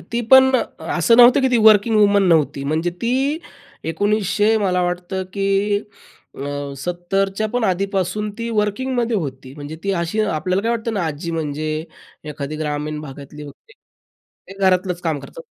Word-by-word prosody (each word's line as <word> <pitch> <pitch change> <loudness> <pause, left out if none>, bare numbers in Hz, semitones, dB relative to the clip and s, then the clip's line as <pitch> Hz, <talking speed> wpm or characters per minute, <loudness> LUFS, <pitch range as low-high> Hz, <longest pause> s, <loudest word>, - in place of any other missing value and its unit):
ती 235 - 0
पण 265 0 +8 0.5
असं 230 +7 +4
नव्हतं, 245 +2 +7
की 265 - +2
ती 245 - +3
वर्किंग 215 +1 +5
वुमन 205 -1 +4
नव्हती. 150 -4 +2
म्हणजे 160 +4 0
ती 265 +6 0 0.5
1900 205 +4 +1
मला 185 -3 +1
वाटतं, 180 +1 -3
की 200 +1 +1 0.6
अ, 145 0 -5
70च्या 175 +6 -1 0.2
पण 245 -2 0
आधीपासून 195 +2 -1
ती 230 0 -3
वर्किंगमध्ये 230 +2 0
होती. 130 -6 -5
म्हणजे 145 +1 -8
ती 195 - 0
अशी 170 +6 -1
आपल्याला 185 -1 0
काय 230 - 0
वाटतं 230 -1 -2
ना, 195 -5 -1
आजी 160 +2 -4
म्हणजे 155 -2 -3 0.6
एखादी 145 +1 -5
ग्रामीण 150 0 -3
भागातली 145 0 -10
वगैरे, 145 - -13 0.8
ते 195 - -15
घरातलंच 185 -1 +1
काम 160 -4 -1
करतात. - - -11
190 Hz, 150 wpm, -20 LUFS, 155-215 Hz, 0.8 s, पण